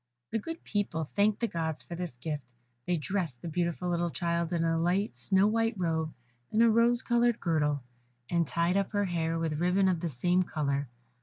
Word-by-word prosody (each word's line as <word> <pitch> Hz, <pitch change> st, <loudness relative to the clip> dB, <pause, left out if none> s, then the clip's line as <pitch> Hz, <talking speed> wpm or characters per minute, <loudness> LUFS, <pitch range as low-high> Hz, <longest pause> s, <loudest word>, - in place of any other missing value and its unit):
The 225 Hz, -, 0 dB
good 330 Hz, +8 st, -7 dB
people 200 Hz, -6 st, -1 dB
thanked 205 Hz, +8 st, +1 dB
the 235 Hz, -, +2 dB
Gods 160 Hz, -5 st, -3 dB
for -, -, -8 dB
this 170 Hz, -7 st, -5 dB
gift; 145 Hz, -3 st, -5 dB, 0.3 s
they 180 Hz, -, +2 dB
dressed 160 Hz, -6 st, -3 dB
the -, -, -4 dB
beautiful 170 Hz, +2 st, -1 dB
little 175 Hz, 0 st, 0 dB
child 170 Hz, 0 st, -1 dB
in 170 Hz, -2 st, +1 dB
a 165 Hz, 0 st, +2 dB
light 180 Hz, +5 st, +1 dB
snow 190 Hz, +12 st, +3 dB
white 225 Hz, +1 st, +2 dB
robe, 160 Hz, -3 st, 0 dB, 0.4 s
with 215 Hz, -, 0 dB
a 230 Hz, -1 st, +6 dB
rose 235 Hz, +2 st, +4 dB
coloured 240 Hz, -1 st, +2 dB
girdle, 150 Hz, -5 st, +1 dB, 0.4 s
and 170 Hz, 0 st, +1 dB
tied 170 Hz, +5 st, +1 dB
up 200 Hz, +1 st, -1 dB
her 205 Hz, 0 st, +2 dB
hair 165 Hz, -2 st, -1 dB
with 160 Hz, -2 st, -1 dB
ribbon 185 Hz, +2 st, +3 dB
of 180 Hz, -3 st, +2 dB
the 170 Hz, 0 st, -2 dB
same 175 Hz, +7 st, +2 dB
colour. 140 Hz, -6 st, -1 dB
175 Hz, 200 wpm, -30 LUFS, 160-200 Hz, 0.4 s, a